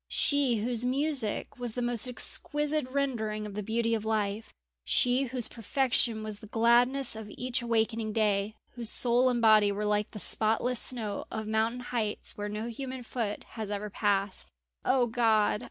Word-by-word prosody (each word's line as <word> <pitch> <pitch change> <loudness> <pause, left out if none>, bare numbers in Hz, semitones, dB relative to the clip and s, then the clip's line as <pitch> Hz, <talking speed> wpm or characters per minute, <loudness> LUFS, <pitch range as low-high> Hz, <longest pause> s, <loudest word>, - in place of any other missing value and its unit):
She 285 -4 +2
whose 230 +2 0
music 260 -3 0
was 240 -2 -2
the 245 - -3
most 240 0 +1
exquisite 295 +3 -1
rendering 230 -6 -2
of 210 - -7
the 210 - -3
beauty 230 +2 0
of 220 -2 -1
life; 215 -1 -2 0.3
she 250 +2 +2
whose 245 -2 +1
perfection 235 -1 +1
was 215 -1 -6
the 215 - -11
gladness 240 +4 +3
of 220 -1 -8
each 250 +3 -2
awakening 225 -1 0
day, 210 -1 +1 0.2
whose 235 -3 -5
soul 245 +2 +3
and 245 -1 0
body 215 -2 +6
were 205 +1 -3
like 210 0 0
the 210 - -9
spotless 225 +4 +1
snow 220 -5 -3
of 220 -1 -4
mountain 220 +3 0
heights 230 -4 -2
where 205 0 -4
no 210 +2 -4
human 260 +2 -6
foot 225 -3 -3
has 220 -3 -6
ever 205 0 -4
passed. 200 -2 -1 0.3
O 255 -1 +3
God! 225 -3 +2
225 Hz, 170 wpm, -29 LUFS, 215-250 Hz, 0.3 s, body